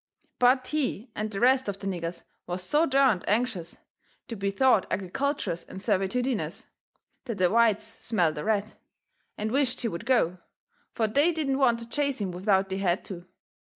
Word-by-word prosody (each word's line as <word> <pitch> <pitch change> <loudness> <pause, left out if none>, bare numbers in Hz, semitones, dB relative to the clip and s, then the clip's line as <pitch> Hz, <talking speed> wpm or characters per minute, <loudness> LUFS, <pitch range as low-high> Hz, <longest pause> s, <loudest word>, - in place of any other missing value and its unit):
But 255 +1 +4
he 270 -6 -2
and 215 +1 -3
the 200 -2 -4
rest 255 0 +3
of 200 - -4
the 195 - -10
niggers 175 -3 -4 0.2
was 180 +1 -3
so 300 - +2
DERNED 265 -8 +3
anxious 210 -6 -1 0.5
to 230 - -4
be 200 -1 -1
thought 220 0 +3
agriculturous 200 - -2
and - - -11
servitudinous 220 +6 -1 0.6
that 230 -5 -4
the 180 -2 +2
whites 225 -1 +1
smelt 175 -9 +2
a - - -4
rat, 215 0 0 0.6
and 215 +1 -2
wished 265 -1 +1
he 235 - 0
would 220 +2 -6
go, 185 -9 +2 0.6
fur 225 - +1
they 285 +10 +3
didn't 285 -4 -1
want 240 -4 +3
to 230 - -7
chase 280 +2 0
him 195 -3 -2
without 190 +1 +1
they 190 0 -3
had 185 +1 0
to. 180 -3 -8
220 Hz, 175 wpm, -27 LUFS, 190-255 Hz, 0.6 s, But